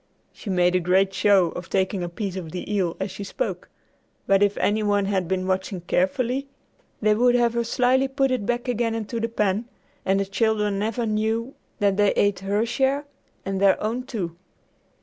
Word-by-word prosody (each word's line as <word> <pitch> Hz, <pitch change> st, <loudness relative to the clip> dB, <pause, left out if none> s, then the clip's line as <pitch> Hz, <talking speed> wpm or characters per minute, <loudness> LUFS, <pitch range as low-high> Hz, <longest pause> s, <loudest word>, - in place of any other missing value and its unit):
She 210 Hz, -, -9 dB
made 180 Hz, -1 st, +3 dB
a 185 Hz, -, +3 dB
great 190 Hz, +2 st, +2 dB
show 195 Hz, -4 st, +4 dB
of 175 Hz, -1 st, -8 dB
taking 190 Hz, 0 st, 0 dB
a 175 Hz, -, -3 dB
piece 190 Hz, +1 st, -4 dB
of 170 Hz, -4 st, -6 dB
the 185 Hz, +4 st, -5 dB
eel 185 Hz, -5 st, 0 dB
as 190 Hz, 0 st, -3 dB
she 200 Hz, -, -7 dB
spoke, -, -, -4 dB, 0.6 s
but 195 Hz, 0 st, +3 dB
if 205 Hz, 0 st, +2 dB
any 215 Hz, +1 st, +1 dB
one 205 Hz, -1 st, +1 dB
had 190 Hz, -3 st, 0 dB
been 185 Hz, 0 st, -1 dB
watching 190 Hz, 0 st, -2 dB
carefully, 250 Hz, +9 st, 0 dB, 0.6 s
they 215 Hz, 0 st, +5 dB
would 245 Hz, +3 st, +3 dB
have 240 Hz, -1 st, +3 dB
her 235 Hz, 0 st, 0 dB
slyly 255 Hz, +3 st, +2 dB
put 270 Hz, 0 st, 0 dB
it 255 Hz, -5 st, 0 dB
back 240 Hz, +3 st, -2 dB
again 235 Hz, -2 st, 0 dB
into 225 Hz, +1 st, -3 dB
the 230 Hz, +1 st, -1 dB
pan, 210 Hz, -1 st, 0 dB, 0.4 s
and 195 Hz, +1 st, +2 dB
the 195 Hz, -, 0 dB
children 210 Hz, 0 st, 0 dB
never 225 Hz, +3 st, -1 dB
knew 220 Hz, +3 st, -1 dB, 0.2 s
that 200 Hz, -2 st, +1 dB
they 205 Hz, -1 st, +4 dB
ate 205 Hz, -2 st, +2 dB
her 200 Hz, +3 st, 0 dB
share 270 Hz, +4 st, 0 dB, 0.4 s
and 195 Hz, 0 st, -2 dB
their 195 Hz, -1 st, +4 dB
own, 225 Hz, +4 st, -2 dB
too. 195 Hz, -10 st, -5 dB
205 Hz, 195 wpm, -24 LUFS, 190-235 Hz, 0.6 s, they